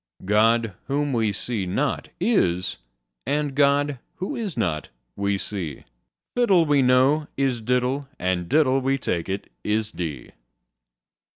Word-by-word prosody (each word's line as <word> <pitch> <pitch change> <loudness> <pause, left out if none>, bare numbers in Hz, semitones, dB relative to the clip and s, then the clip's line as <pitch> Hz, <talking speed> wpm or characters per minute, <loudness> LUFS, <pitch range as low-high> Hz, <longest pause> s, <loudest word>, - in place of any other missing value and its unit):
God, 110 +2 +3
whom 145 0 0
we 110 -3 +2
see 100 -1 -3
not, 135 +11 -1
is: 95 - +1 0.5
and 145 0 0
God, 140 0 +2 0.2
who 190 +11 -4
is 210 - -4
not, 80 -9 -1 0.3
we 100 0 0
see: 90 -8 -5 0.5
Fiddle, 195 -9 +4
we 145 -2 +3
know, 130 +4 +4
is 135 -4 0
diddle: 125 +4 0
and 90 -2 -1
diddle, 135 -3 +3
we 135 +1 +1
take 90 -9 -2
it, 95 +1 -4
is 110 0 0
dee. 75 -8 -5
125 Hz, 130 wpm, -24 LUFS, 100-145 Hz, 0.5 s, Fiddle